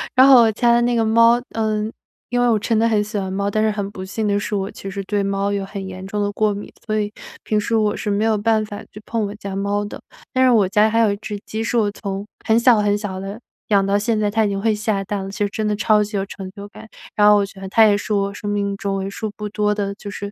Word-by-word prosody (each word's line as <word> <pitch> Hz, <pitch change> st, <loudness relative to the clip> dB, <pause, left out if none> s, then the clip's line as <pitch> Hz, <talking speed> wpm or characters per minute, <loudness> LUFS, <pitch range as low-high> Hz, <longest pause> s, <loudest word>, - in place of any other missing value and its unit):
然 260 Hz, +1 st, +7 dB
后 260 Hz, -3 st, +9 dB
我 225 Hz, -1 st, +4 dB
家 235 Hz, +2 st, +2 dB
的 240 Hz, -, +4 dB
那 240 Hz, 0 st, +1 dB
个 225 Hz, -1 st, +2 dB
猫 230 Hz, +2 st, +5 dB
呃， 215 Hz, -1 st, -1 dB, 0.4 s
因 245 Hz, 0 st, +1 dB
为 245 Hz, -, +3 dB
我 220 Hz, -2 st, +3 dB
真 225 Hz, +2 st, 0 dB
的 230 Hz, +1 st, +3 dB
很 215 Hz, -2 st, +2 dB
喜 210 Hz, +1 st, -5 dB
欢 190 Hz, -1 st, -3 dB
猫， 200 Hz, +1 st, -1 dB
但 215 Hz, +1 st, 0 dB
是 220 Hz, -, +2 dB
很 205 Hz, -1 st, -3 dB
不 190 Hz, -2 st, -7 dB
幸 210 Hz, +3 st, -3 dB
的 205 Hz, 0 st, +1 dB
是， 210 Hz, -, -5 dB
我 195 Hz, 0 st, -2 dB
其 195 Hz, -, -8 dB
实 195 Hz, 0 st, -4 dB
对 205 Hz, 0 st, 0 dB
猫 200 Hz, 0 st, -1 dB
有 200 Hz, -1 st, -1 dB
很 195 Hz, 0 st, -6 dB
严 185 Hz, 0 st, -8 dB
重 205 Hz, +2 st, -3 dB
的 205 Hz, 0 st, 0 dB
过 210 Hz, 0 st, +1 dB
敏， 200 Hz, +1 st, -8 dB
所 215 Hz, -1 st, 0 dB
以 210 Hz, 0 st, -2 dB, 0.3 s
平 215 Hz, -, 0 dB
时 225 Hz, +2 st, -1 dB
我 210 Hz, -2 st, +2 dB
是 210 Hz, -, -4 dB
没 205 Hz, +2 st, +1 dB
有 220 Hz, -1 st, +2 dB
办 215 Hz, +1 st, +1 dB
法 205 Hz, -1 st, -8 dB
去 210 Hz, -, -11 dB
碰 225 Hz, -2 st, -1 dB
我 200 Hz, -, -6 dB
家 200 Hz, -2 st, -6 dB
猫 200 Hz, +1 st, -1 dB
的。 205 Hz, -, -8 dB, 0.3 s
但 260 Hz, -, +3 dB
是 260 Hz, -, +5 dB
我 215 Hz, -5 st, +4 dB
家 210 Hz, +3 st, +3 dB
还 225 Hz, +1 st, +1 dB
有 220 Hz, -3 st, +4 dB
一 -, -, -3 dB
只 210 Hz, 0 st, -6 dB
鸡， 220 Hz, +1 st, -4 dB
是 230 Hz, +2 st, -1 dB
我 215 Hz, -3 st, +2 dB
从 200 Hz, -1 st, -5 dB, 0.2 s
很 225 Hz, +1 st, +4 dB
小 235 Hz, -1 st, +5 dB
很 205 Hz, 0 st, +2 dB
小 200 Hz, -3 st, -5 dB
的 200 Hz, +3 st, -6 dB, 0.3 s
养 200 Hz, -2 st, +3 dB
到 200 Hz, +1 st, +2 dB
现 215 Hz, +1 st, 0 dB
在， 210 Hz, -1 st, +1 dB
它 220 Hz, +2 st, +1 dB
已 -, -, 0 dB
经 195 Hz, 0 st, -2 dB
会 220 Hz, 0 st, +2 dB
下 210 Hz, -1 st, -1 dB
蛋 195 Hz, 0 st, -3 dB
了， 195 Hz, -, -6 dB
其 -, -, -9 dB
实 205 Hz, -, 0 dB
真 215 Hz, +1 st, -3 dB
的 210 Hz, -, 0 dB
超 210 Hz, 0 st, +3 dB
级 210 Hz, 0 st, -4 dB
有 195 Hz, -, -1 dB
成 195 Hz, -1 st, -8 dB
就 200 Hz, -1 st, -8 dB
感。 205 Hz, -, -13 dB, 0.3 s
然 210 Hz, 0 st, +5 dB
后 210 Hz, -, +6 dB
我 200 Hz, -, +2 dB
觉 195 Hz, 0 st, -13 dB
得 190 Hz, -, -6 dB
它 225 Hz, +3 st, +6 dB
也 205 Hz, -1 st, +4 dB
是 205 Hz, -, -6 dB
我 200 Hz, -1 st, 0 dB
生 205 Hz, +1 st, -5 dB
命 200 Hz, -1 st, -1 dB
中 195 Hz, 0 st, -2 dB
为 195 Hz, 0 st, -3 dB
数 215 Hz, +1 st, -5 dB
不 210 Hz, -, -4 dB
多 210 Hz, 0 st, 0 dB
的 200 Hz, -1 st, -2 dB
就 205 Hz, 0 st, -8 dB
是 205 Hz, 0 st, -6 dB
210 Hz, 325 characters per minute, -20 LUFS, 200-220 Hz, 0.4 s, 后